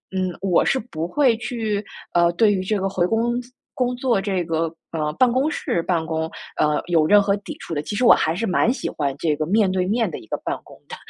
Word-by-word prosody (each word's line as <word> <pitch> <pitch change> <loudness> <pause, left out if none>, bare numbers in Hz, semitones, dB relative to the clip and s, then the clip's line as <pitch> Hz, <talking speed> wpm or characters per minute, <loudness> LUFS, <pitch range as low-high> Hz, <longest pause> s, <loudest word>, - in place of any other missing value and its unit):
嗯， 185 -1 -1
我 190 -3 +2
是 265 - +2
不 170 -9 -5
会 245 +2 +2
去， 220 -4 -2 0.3
呃， 170 0 +4
对 210 +3 +4
于 185 - -1
这 205 +2 -1
个 195 0 -1
回 180 -2 +1
公 235 +3 0
司 245 - -16 0.2
工 250 -1 -1
作 245 -4 +1
这 195 -3 -1
个， 165 0 -1 0.3
呃， 150 -2 -2
办 245 +8 +3
公 265 +5 +1
室 170 - -1
办 165 -3 0
公， 160 0 -2 0.3
呃， 150 0 +1
有 160 -3 +3
任 205 +2 +6
何 200 0 +1
抵 200 - -8
触 - - -7
的。 145 - -1
其 205 - -5
实 250 - 0
我 - - +8
还 160 - +1
是 220 +6 -1
蛮 210 +4 +2
喜 - - -4
欢 140 -3 -2
这 155 -1 0
个 155 - -1
面 195 +2 +2
对 185 -1 0
面 220 -3 +1
的 - - -6
一 - - -15
个 - - -2
办 - - -2
公 - - -14
的， - - -6
195 Hz, 270 characters per minute, -22 LUFS, 165-230 Hz, 0.3 s, 我